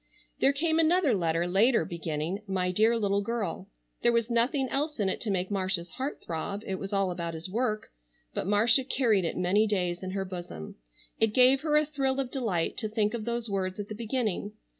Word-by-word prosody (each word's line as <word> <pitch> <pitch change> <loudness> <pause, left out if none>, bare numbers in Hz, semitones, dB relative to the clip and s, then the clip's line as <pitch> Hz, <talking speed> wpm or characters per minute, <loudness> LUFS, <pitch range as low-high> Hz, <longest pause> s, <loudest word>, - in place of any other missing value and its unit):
There 275 - +5
came 320 +3 +1
another 330 -3 +4
letter 170 -3 +1
later 200 +3 +3
beginning, 165 +3 -3
"My 185 -1 0
dear 220 +5 +3
little 200 -2 +1
girl." 200 -3 -3 0.3
There 240 - +4
was 235 0 +1
nothing 255 +4 +2
else 295 +1 -1
in 200 -2 +2
it - - -3
to 225 - -3
make 190 0 -1
Marcia's 185 -3 -1
heart 265 - -5
throb, 200 +5 -4
it 190 -1 -3
was 195 - -6
all 195 -2 +1
about 170 -2 -4
his 160 +2 -4
work, 215 +2 -2 0.4
but - - -3
Marcia 225 +6 +4
carried 235 -8 +2
it - - -2
many 190 +4 +3
days 180 -4 -1
in 185 - -4
her 195 -1 -2
bosom. 175 - -7 0.4
It 220 -1 +2
gave 260 +1 +6
her 300 -1 +2
a 305 - +3
thrill 270 -2 -1
of 260 -2 -2
delight 220 - -1
to 215 -3 -3
think 215 0 0
of 225 -3 -4
those 235 0 -2
words 190 -1 -2
at 205 - -5
the - - -4
beginning. 220 -3 -2
210 Hz, 205 wpm, -28 LUFS, 185-245 Hz, 0.4 s, gave